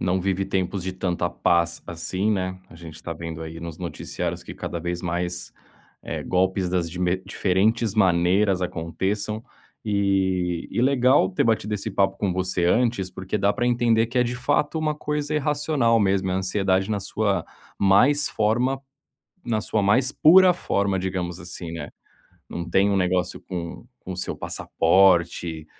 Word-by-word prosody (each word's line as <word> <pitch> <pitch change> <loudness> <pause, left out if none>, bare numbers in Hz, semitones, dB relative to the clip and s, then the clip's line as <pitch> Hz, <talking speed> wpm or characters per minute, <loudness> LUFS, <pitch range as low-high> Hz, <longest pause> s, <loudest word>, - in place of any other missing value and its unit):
não 95 +1 +1
vive 95 +1 0
tempos 95 0 -2
de 95 +1 -3
tanta 90 -2 -1
paz 85 -1 +1
assim, 95 +5 -2
né, 95 -2 -1
a - - -14
gente 80 -1 -10
está 80 +1 -6
vendo 80 0 -6
aí, 80 +1 -8
nos 85 -2 -7
noticiários 85 -2 -4
que - - -9
cada 85 - -5
vez 85 +1 -4
mais, 90 0 -3 0.5
eh, - - -4
golpes 95 0 +1
das 85 -2 -1
me 90 0 +1
diferentes 105 +3 +1
maneiras 95 0 +3
aconteçam, 95 +6 -3 0.4
eh, - - -3 0.8
e 120 - -1
legal 130 -5 +4
ter 95 - 0
batido 110 -2 +1
esse 105 +2 -3
papo 95 -1 +1
com 100 -3 -1
você 90 -1 0
antes, 110 -1 +1
porque 95 +3 -4
dá 100 +1 +2
para 120 - -1
entender 115 -2 +2
que 125 +2 -3
é, 125 - +5
de 120 +1 -3
fato, 145 +5 0
uma 155 -1 0
coisa 150 0 -3
irracional 145 -5 +1
mesmo, 95 -1 +1
é - - 0
ansiedade 95 +1 0
na 100 - 0
sua 100 +1 -1 0.3
mais 125 +10 +4
forma 120 +5 +1 0.7
na 115 -3 0
sua 105 - -1
mais 125 +7 +3
pura 180 +3 +6
forma, 100 - 0
digamos 90 -2 -3
assim, 85 -1 -8
né. 80 -3 -6 0.6
Não 85 0 -5
tem 100 +1 +3
um 100 - +1
negócio 90 -1 0
com 85 -2 -6 0.2
com 95 - -7
o - - -6
seu 90 - -3
passaporte, 85 -3 +2
95 Hz, 165 wpm, -24 LUFS, 90-110 Hz, 0.8 s, pura